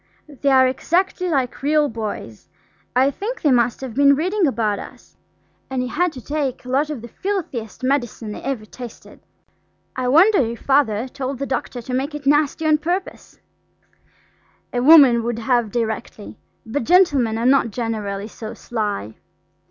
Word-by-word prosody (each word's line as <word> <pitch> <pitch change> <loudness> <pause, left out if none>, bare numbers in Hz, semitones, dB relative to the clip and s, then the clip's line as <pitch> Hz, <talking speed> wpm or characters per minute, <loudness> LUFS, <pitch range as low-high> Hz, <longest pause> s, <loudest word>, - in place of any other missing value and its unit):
They 285 -1 -2
are 260 -1 +6
exactly 360 +7 0
like 265 -6 -1
real 300 +1 +2
boys; 215 - -6 0.5
I 265 +2 +4
think 455 - -6
they 295 - +4
must 240 -1 +2
have 260 -4 -6
been 280 +2 +5
reading 365 +4 +1
about 220 -6 0
us. - - -12 0.5
And 265 -1 -2
he - - -3
had 355 +4 0
to 255 - -11
take 285 -4 -3
a - - -8
lot 280 +4 +1
of 275 -7 -5
the - - -7
filthiest 270 - -4
medicine 240 -5 -1
I - - -7
ever 260 -5 -4
tasted. 240 +2 -11 0.8
I 255 -1 -2
wonder 360 +11 +5
if 235 -3 -1
Father 260 -5 +2
told 265 +1 -5
the 275 - -3
doctor 250 -2 -4
to 250 - -6
make 275 +4 -2
it 295 -1 -8
nasty 295 +2 +2
on 305 -1 +3
purpose? 355 +5 -4 1.3
A 245 - 0
woman 270 -4 +7
would 235 0 -3
have 240 -1 +1
directly, 220 -1 -4 0.3
but 235 +4 -2
gentlemen 285 -9 +3
are 230 - -2
not 260 -2 +4
generally 210 -3 -4
so 220 0 -8
sly. 205 - -4
260 Hz, 165 wpm, -21 LUFS, 230-295 Hz, 1.3 s, woman